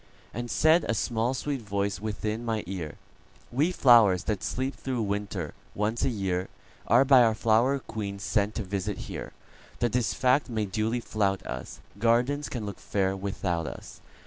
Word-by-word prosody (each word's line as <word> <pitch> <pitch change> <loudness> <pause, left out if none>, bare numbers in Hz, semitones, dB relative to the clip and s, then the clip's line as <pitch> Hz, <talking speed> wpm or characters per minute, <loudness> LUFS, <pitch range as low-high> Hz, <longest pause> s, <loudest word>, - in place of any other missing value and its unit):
And 120 +2 -4
said 155 - +4
a 115 - +2
small, 115 +3 0
sweet 140 0 -3
voice 100 -2 -2
within 110 +1 -3
my 110 -2 -1
ear:"We 95 - -4
flowers, 115 - +6
that 105 -3 -2
sleep 130 +2 -2
through 125 -4 -3
winter, 100 -5 -3 0.2
once 105 +3 0
a 135 - +3
yearAre 95 +4 0
by 130 -2 +7
our 115 -2 +4
flower 115 +5 +3
queen 105 -6 -5
sent 100 +1 0
to 110 - -2
visit 100 +1 -3
here, - - -6 0.5
That 120 -2 0
this 125 0 0
fact 130 +2 +2
may 110 -3 -1
duly 110 +4 -1
flout 100 -4 -1
us,—Gardens 120 - -1
can 115 -4 -4
look 100 -3 -6
fair 95 -1 0
without 95 -4 -2
us. - - -9
110 Hz, 155 wpm, -28 LUFS, 100-120 Hz, 0.5 s, by